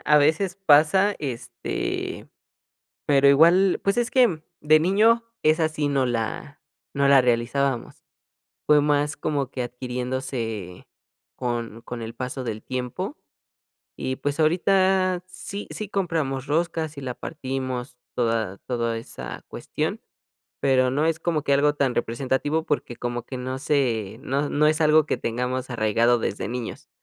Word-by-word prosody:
a 150 0 +5
veces 170 +6 +2
pasa, 160 +7 +5
este, 145 - -4 0.8
pero 140 -1 +5
igual, 170 +7 +5
pues 200 +3 +1
es 240 0 +1
que, 240 - +3 0.2
de 155 +1 +5
niño 215 +7 +4 0.2
esa 155 +1 +3
sí 150 -2 -1
no 135 -2 +1
la 120 +4 -3 0.3
no 140 -1 +2
la 140 -2 +7
realizábamos. 125 +2 0 0.6
Fue 150 -1 +6
más 145 0 +1
como 140 -4 -2
que 130 - -3
adquiriéndose 125 -5 -4 0.5
con 115 -2 -3
con 120 0 -7
el 115 +1 -7
paso 130 +1 -4
del 110 -2 -5
tiempo, 130 - -4 0.8
y 130 - -3
pues, 145 +3 -2
ahorita 185 +2 +3
sí, 200 +2 -8
sí, 215 - -5
compramos 155 -9 -1
roscas, 160 0 -1
y - - -6
la 125 -2 -4
partimos 130 -4 -5 0.2
toda 115 -5 0
toda 115 -2 -1
esa 115 - -8
cuestión, - - -3 0.6
pero, 130 -2 +3
no 145 +5 +1
es 165 0 +1
como 165 -3 0
que 140 - 0
algo 145 +1 +3
tan 135 -4 0
representativo 130 +6 -1
porque 130 -6 -2
como 120 -1 -3
que 130 - -7
no 130 +1 -4
se 115 -8 0
no 140 0 -1
no 150 +1 +2
es 155 0 +1
algo 155 -1 +5
que - - 0
tengamos 125 +2 -3
arraigado 115 +1 +2
desde 100 - -2
niños. 125 -1 -6
140 Hz, 145 wpm, -24 LUFS, 125-155 Hz, 0.8 s, la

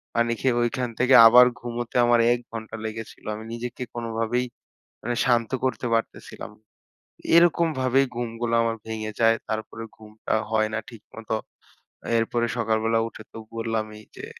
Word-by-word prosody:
পানি 115 0 +2
খেয়ে 130 -2 +2
ঐখান 120 +1 -1
থেকে 125 +1 +5
আবার 125 +2 +8
ঘুমোতে 120 -1 -6
আমার 120 0 +4
১ 120 - -2
ঘন্টা 110 -1 -7
লেগেছিল। 110 0 -7
আমি 110 - -8
নিজেকে 120 +1 -5
কোনভাবেই 115 +1 -1 0.6
মানে 120 +1 -2
শান্ত 120 -3 +2
করতে 130 - -2
পারতেছিলাম। 115 -2 -4 0.8
এইরকম 170 0 +5
ভাবেই 130 +1 +3
ঘুমগুলো 115 0 -3
আমার 115 0 -1
ভেঙে 110 -1 -4
যায়। 115 0 +5
তারপরে 110 +1 -4
ঘুমটা 110 0 -6 0.2
হয় 110 -1 +2
না 110 - 0
ঠিকমত। 110 -1 -13 0.9
এরপরে 120 +1 0
সকালবেলা 115 0 +1
উঠে 115 - -11
তো - - -9 0.2
বললামই 110 -2 -3 0.2
যে - - -7
115 Hz, 140 wpm, -24 LUFS, 110-120 Hz, 0.9 s, আবার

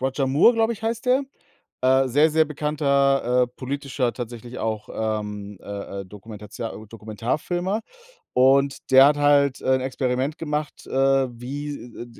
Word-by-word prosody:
Roger 135 +1 -1
Moore, 150 - +5
glaube 225 0 +2
ich, 225 - -10
heißt 230 +2 -3
der. 260 +2 +3 0.6
Äh, 130 +1 +4
sehr, 145 +5 +4
sehr 160 +1 +3
bekannter, 140 -4 +1
äh, - - -8
politischer, 135 -2 -2
tatsächlich 120 0 -7
auch, 110 -1 -3
ähm, 105 -2 -4
äh, 100 -1 -6
äh, - - -7
Dokumentatio 105 +2 -8
äh, - - -17
Dokumentarfilmer. 125 - -3 0.5
Und 135 +1 +3
der 135 +1 +9
hat 145 - +3
halt, 145 -2 +3
äh, 130 - +3
'n - - -3
Experiment 130 +2 -1
gemacht, 150 -1 -4
äh, - - -13 0.5
wie 145 +4 -5 0.2
d 120 - -8
130 Hz, 155 wpm, -23 LUFS, 115-150 Hz, 0.6 s, der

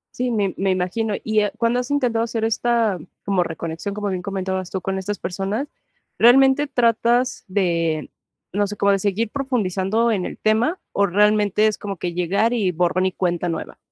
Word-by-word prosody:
Sí, 250 0 -1
me 205 -5 0
me 195 0 0
imagino. 190 +4 -1
Y, 215 -1 +1
ah, 210 - 0
cuando 235 +1 +1
has 250 - -4
intentado 250 -6 +1
hacer 225 -1 -2
esta, 225 -3 +1 0.3
como 195 -2 +2
reconexión, 165 +3 -4
como 205 -1 -2
bien 185 -1 -2
comentabas 190 -1 -3
tú, 190 - -3
con 190 +1 -3
estas 205 +2 -3
personas, 195 +9 -3 0.5
¿realmente 270 +4 +6
tratas 240 -1 +1
de, 170 -5 0 0.4
no 205 +1 0
sé, 205 +1 -6
como, 200 0 +3
de 195 - +2
seguir 205 +3 -1
profundizando 230 -4 0
en 195 -5 -1
el - - -8
tema? 230 +11 +1
¿O 200 0 +2
realmente 210 +2 +3
es 215 - +1
como 200 -2 -5
que 175 +1 -3
llegar, 195 +7 +1
y 205 -6 +1
borrón 180 +2 +1
y - - -1
cuenta 175 -1 -1
nueva? 165 - -5
205 Hz, 185 wpm, -21 LUFS, 185-230 Hz, 0.5 s, realmente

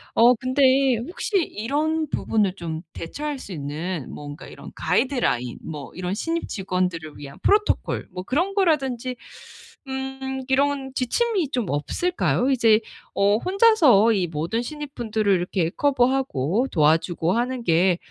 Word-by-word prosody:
어 240 +2 +7
근데 260 +1 +3
혹시 355 - -2
이런 310 - -1
부분을 210 -4 +1
좀 165 -3 -5
대처할 290 - -5
수 205 - -10
있는 155 +1 -4
뭔가 145 +1 -9
이런 - - -11
가이드라인 240 - 0
뭐 150 -3 -7
이런 180 +1 -3
신입 330 +10 -2
직원들을 180 -5 -3
위한 140 -1 -10
프로토콜 420 +1 +1
뭐 180 - -5
그런 340 - 0
거라든지 270 - 0 0.7
음 265 0 -4
이런 275 0 +1
지침이 360 - 0
좀 245 -5 -1
없을까요? 260 - 0
이제 230 -4 +4 0.4
어 200 +1 +3
‘혼자서 340 - +5
이 190 -4 0
모든 165 +8 -2
신입분들을 240 -7 -2
이렇게 175 -2 0
커버하고 255 - +1
도와주고 165 +2 +2
하는 245 +1 -1
게 175 +2 +3
240 Hz, 290 characters per minute, -23 LUFS, 180-275 Hz, 0.7 s, 어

